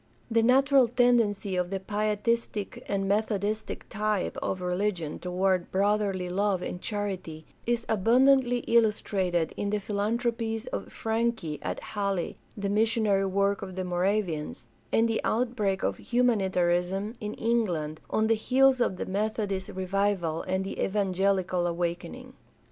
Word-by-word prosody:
The 230 0 +4
natural 265 +2 +5
tendency 230 -5 +2
of 180 -1 0
the 195 0 -2
Pietistic 210 +1 -1
and 195 -1 -1
Methodistic 210 +1 -1
type 210 -2 -1
of 190 - -2
religion 180 -3 -2
toward 185 0 0
brotherly 200 -1 +1
love 190 0 0
and 180 - -5
charity 190 -7 -4 0.2
is 235 -1 0
abundantly 245 +4 +4
illustrated 195 -7 +1
in 205 - -2
the 210 +1 0
philanthropies 225 +2 -1
of - - -5
Franke 225 -9 -1
at - - -4
Halle, 200 -4 -2 0.2
the 200 -1 -2
missionary 210 -2 +2
work 200 +1 +1
of 185 - -7
the 185 0 -3
Moravians, 180 - -1 0.3
and 225 +1 +3
the 225 -1 0
outbreak 215 -5 0
of - - 0
humanitarianism 195 -4 +1
in 210 0 -4
England 180 -10 -1
on 220 - +1
the 225 - +4
heels 260 +3 +3
of 190 - +1
the - - -3
Methodist 200 -1 -2
revival 190 -3 -1
and 190 +1 -1
the - - -4
evangelical 190 -2 +1
awakening. 170 - -4
200 Hz, 130 wpm, -28 LUFS, 185-225 Hz, 0.3 s, natural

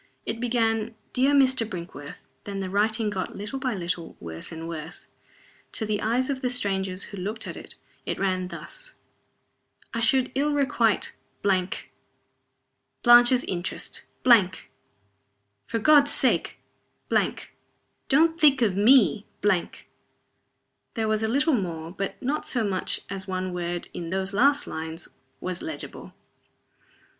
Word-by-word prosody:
It 230 - -3
began: 225 -2 0 0.2
"Dear 265 +2 +3
Mr. 260 -3 +4
Brinkworth." 170 -8 -8 0.2
Then 200 -1 -4
the 190 -1 -4
writing 215 +1 +1
got, 190 -2 -4
little 210 +7 -5
by 255 -4 -1
little, 175 -2 -4
worse 80 - -7
and 165 0 -6
worse. 160 -2 -7 0.6
To 220 - -1
the 210 -1 -1
eyes 245 +4 +1
of 270 -2 -2
the 250 - 0
strangers 195 -6 0
who 200 - -7
looked 210 +4 -4
at - - -6
it, - - -10 0.3
it - - -3
ran 185 -2 0
thus: - - -8 1.0
"I 230 - -1
should 255 +3 +2
ill 290 +2 +1
requite 245 -6 +1 0.3
Blanche's 185 -2 +1 1.6
interests 175 -1 -3 1.7
For - - -1
God's 285 +5 +6
sake! - - +2 1.5
don't 320 +4 +4
think 275 -5 +6
of 200 -5 +2
me 215 0 +5
" - - -41
There 190 -4 +2 1.4
was 215 0 +1
a 220 - +1
little 285 +7 +2
more, 170 -7 -2
but 195 +1 -4
not 290 +4 -2
so 240 -3 0
much 195 -3 -1
as 190 0 -6
one 185 -1 -3
word, 175 0 -3
in 170 -1 -5
those 190 +2 -1
last 280 +7 +3
lines, 160 +1 -5 0.3
was 185 -1 -4
legible. 320 - -7
210 Hz, 130 wpm, -26 LUFS, 185-255 Hz, 1.7 s, God's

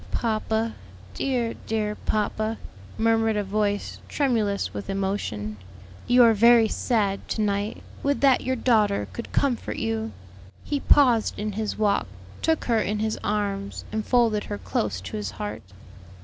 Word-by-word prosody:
"Papa, 220 0 -1 0.4
dear, 245 -4 -1
dear 215 -1 0
papa," 215 +1 -1 0.4
murmured 225 -1 +2
a 205 - +1
voice 205 +1 -1
tremulous 225 -8 0
with 200 - -6
emotion, 190 - -2 0.5
"you 245 0 +6
are 230 -1 +6
very 230 +1 +6
sad 205 -4 0
to 220 - -2
night; 205 +1 -1 0.2
would 285 0 +1
that 270 -2 +5
your 260 +1 -1
daughter 215 -5 +2
could 235 - -7
comfort 265 -4 0
you!" 225 0 -2 0.5
He 290 - -1
paused 250 -6 +4
in 210 +1 -2
his 215 +1 -3
walk, 205 - +1 0.3
took 320 -1 +1
her 230 -2 +2
in 210 0 -1
his 215 +1 -1
arms 200 -1 -2
and 215 0 -1
folded 230 -4 +2
her - - -4
close 95 0 -2
to 95 +2 -6
his 105 -2 -3
heart. 105 +3 -5
215 Hz, 150 wpm, -25 LUFS, 200-230 Hz, 0.5 s, you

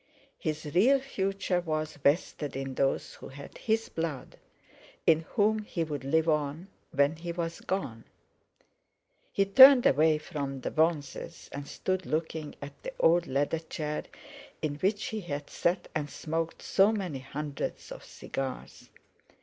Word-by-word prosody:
His 155 0 -3
real 250 +10 +5
future 195 -7 -1
was 155 -3 -3
vested 145 0 0
in 135 0 -4
those 135 +1 0
who - - -10
had 140 +1 -11
his 225 0 0
blood, 160 -5 -4 0.7
in 160 -1 +6 0.2
whom 215 0 +3
he 195 -5 -3
would 145 -4 -4
live 160 +4 +2
on 150 +3 0 0.2
when 140 +3 +2
he 170 +1 -5
was 170 -1 -4
gone. 115 -13 -3 1.3
He 195 - +2
turned 260 +5 +9
away 155 +2 +5
from 140 -4 -5
the - - -3
bronzes 160 0 -1
and 140 0 -6
stood 185 -1 -2
looking 160 -1 -2
at 140 0 -10
the - - -6
old 170 +1 +4
leather 145 +4 0
chair 155 -2 -4 0.5
in 150 -2 -2
which 200 +6 0
he 220 -1 -3
had 145 -5 -5
sat 175 +2 0
and 150 -2 -2
smoked 165 +3 -3
so 195 +3 +4
many 185 -10 -3
hundreds 140 +2 -5
of - - -8
cigars. 135 -1 -6
160 Hz, 145 wpm, -29 LUFS, 145-185 Hz, 1.3 s, turned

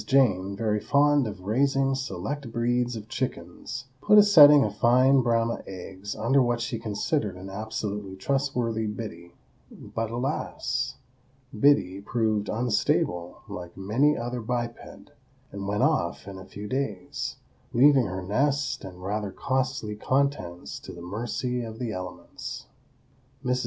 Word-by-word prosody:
Jane, 100 -8 +3
very 105 0 0
fond 145 +1 +3
of 100 -3 -7
raising 135 +5 +2
select 130 +2 -4
breeds 120 +1 0
of 110 -1 -7
chickens, 130 +3 -5 0.2
put 210 0 +6
a 210 - +10
setting 150 -8 +9
of 105 -1 -4
fine 130 +4 +5
Brahma 115 -1 +1
eggs 95 +2 -7
under 135 +5 +3
what 120 -1 +1
she 120 -1 -3
considered 110 - -1
an 95 +1 -9
absolutely 105 -2 -4
trustworthy 120 -1 -1
Biddy,—but, 105 +2 -7
alas! 120 - -2 0.6
Biddy 105 -6 +3
proved 110 -1 0
unstable, 105 -6 0
like 90 -1 -8
many 120 +10 +2
another 120 +1 -3
biped, 120 +1 -2 0.7
and 100 -1 -5
went 105 +1 0
off - - +1
in 95 -1 -7
a 95 - -10
few 105 +2 -8
days, 105 -7 -3 0.4
leaving 130 -1 +5
her 95 0 -4
nest 135 +6 0
and 90 -2 -9
rather 105 +1 -2
costly 130 -1 -2
contents 105 - -1
to - - -10
the 85 - -10
mercy 120 +6 -3
of 110 -1 -7
the 120 -2 -3
elements. 90 -2 -7 0.8
Mrs. 125 0 +1
115 Hz, 135 wpm, -27 LUFS, 100-130 Hz, 0.8 s, a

